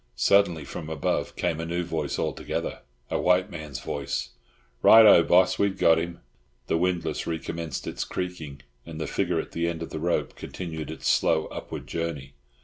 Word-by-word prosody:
Suddenly 85 +3 +3
from 75 - -7
above 80 -3 -1
came 80 - -1
a 80 - -3
new 85 +1 -1
voice 80 -4 -3
altogether, - - -3 0.3
a - - 0
white 90 +3 +3
man's 75 -5 -6
voice. - - -3 0.5
"Right 110 0 +9
oh, 105 - +8
boss! 90 +2 +4
We've 100 -1 +1
got 80 0 +5
him." 85 +1 -5 0.4
The 80 - 0
windlass 90 -1 -1
recommenced 80 -2 -4
its - - -3
creaking, 80 -7 -5 0.2
and 80 -1 -9
the 80 - -2
figure - - 0
at - - -5
the 85 0 -1
end 85 -1 -3
of - - -8
the 80 - -4
rope 85 +2 -1
continued 80 -4 -6
its 80 - -5
slow, 80 - +3
upward - - -7
journey. 80 -5 -4
85 Hz, 175 wpm, -26 LUFS, 80-90 Hz, 0.5 s, Right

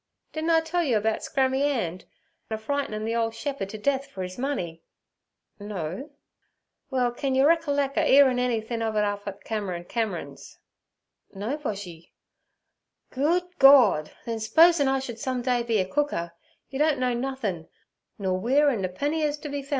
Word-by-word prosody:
'Didn' 315 +1 -2
I 325 -1 +5
tell 330 +2 -1
yer 255 -8 +2
about 220 +1 0
Scrammy 265 0 0
'And 225 - -1 0.4
a 220 - -2
frightin' 220 -2 -3
the 225 - -1
ole 230 -1 +1
shep'e'd 225 -3 -4
t' 215 - -6
death 275 +5 0
fer 195 -9 -6
his 185 0 -6
money?' 215 - -3 0.8
'No.' 205 - -5 0.8
'Well, 250 -3 +1
can 265 +2 -2
yer 265 +1 +4
reckerlec 285 -4 +2
a - - +3
'earin' 265 -2 +6
anythin' 230 -2 -1
ov 220 -1 -1
it 210 - +2
up 205 0 -3
et 200 0 -7
Cameron 195 -6 -3
Cameron's?' 180 - -4 0.8
'No, 210 +8 -2
Boshy.' 200 - -7 1.0
'Good 315 +7 +1 0.2
Gord! 245 - +7 0.2
then 230 -1 -3
s'posin' 320 +6 +5
I 270 0 +2
should 245 -4 -6
some 255 0 -2
day 245 -1 +1
be 230 -2 0
a 190 - +1
cooker, 190 -10 -1 0.4
yer 270 - -4
don't 305 -1 +3
know 255 -1 0
nothin', 240 -10 -3 0.5
nor 185 -2 -1
weer 275 +8 +3
an 235 -7 -1
napenny 285 - -2
is 300 -1 0
to 295 0 -7
be 285 0 -3
foun'. 275 - -16
245 Hz, 170 wpm, -26 LUFS, 205-280 Hz, 1.0 s, Gord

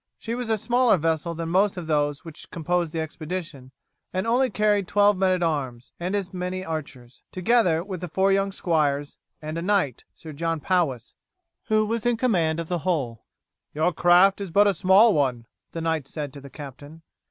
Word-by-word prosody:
She 230 - -5
was 245 -1 -4
a 220 - +2
smaller 240 0 +3
vessel 165 +1 -1
than 165 0 -4
most 190 +3 +2
of 175 - -5
those 145 -1 0
which 165 -2 -11
composed 170 -1 -1
the 165 - -3
expedition, 160 -3 -6 0.4
and 185 +2 -2
only 250 +3 +2
carried 210 -3 +1
twelve 205 0 +4
men 190 0 +2
at 180 -1 +1
arms 130 -7 -3
and 180 +3 -2
as 195 -2 -3
many 185 +1 -4
archers, 140 -7 -7
together 185 -4 +2
with 185 -2 -6
the 180 - -4
four 190 +4 +1
young 195 0 +1
squires, 145 -6 -1 0.3
and 155 +2 -4
a - - -4
knight, 185 - 0
Sir 160 -2 -10
John 165 +2 -2
Powis, 145 -9 -1 0.5
who 215 0 +2
was 230 +1 -1
in 240 -1 +2
command 170 -10 +1
of 165 - -4
the 175 0 -1
whole. 140 -10 -2 0.5
"Your 160 +4 +1
craft 180 +4 +4
is 195 - -4
but 200 +5 +4
a 200 - +3
small 200 +4 +5
one," 130 -6 0 0.3
the 165 - -5
knight 160 -4 -1
said 145 -3 -6
to 140 - -10
the 140 - -11
captain. 145 +3 -11
170 Hz, 195 wpm, -24 LUFS, 155-195 Hz, 0.5 s, small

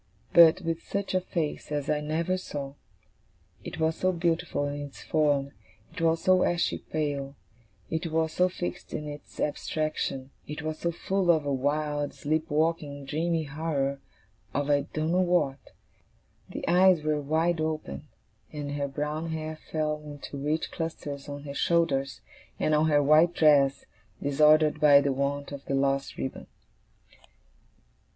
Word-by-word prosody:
But 170 +2 +8
with 165 -1 -2
such 200 -1 -3
a 185 - +2
face 165 -5 -3
as 145 -1 -2
I 150 -1 +1
never 160 +4 0
saw. 145 -7 -5 0.9
It - - -7
was 160 0 +1
so 185 - +2
beautiful 165 -4 0
in 145 0 -4
its 145 -1 -9
form, 145 -3 +1 0.4
it - - -6
was 165 0 +2
so 185 -1 +5
ashy 175 0 +1
pale, 145 -3 -3 0.5
it 160 +2 -2
was 160 0 0
so 180 +1 +3
fixed 175 -1 -5
in 150 - -4
its 145 0 -10
abstraction, 145 -3 -2 0.2
it 150 +1 -6
was 155 0 -3
so 170 - 0
full 190 +2 -1
of 160 -3 +4
a 140 - 0
wild, 145 +2 -1
sleep 155 +2 -1
walking, 150 -2 0
dreamy 165 +3 0
horror 140 -2 -2 0.6
of 145 +1 +1
I 145 -1 +2
don't 155 +1 -1
know 180 +1 +3
what. 175 -7 +1 0.9
The - - -6
eyes 180 -2 +5
were 150 -1 0
wide 160 +3 +1
open, 155 - -3 0.4
and 145 -1 -5
her 145 -1 -2
brown 150 +4 -3
hair 155 0 -4 0.2
fell 150 -1 -1
in 145 -1 -8
two 140 -1 -7
rich 155 +2 -1
clusters 145 -4 -5
on 145 0 -6
her 140 -1 -6
shoulders, 140 -4 +1 0.4
and 155 - +1
on 150 +1 +3
her 145 -1 +4
white 155 +4 +5
dress, 140 -3 +4 0.3
disordered 150 +2 +4
by 145 -2 +8
the 140 -1 +1
want 140 +1 -2
of 140 -1 -7
the 135 - -1
lost 135 0 0
ribbon. 130 - -5
150 Hz, 160 wpm, -28 LUFS, 145-165 Hz, 0.9 s, But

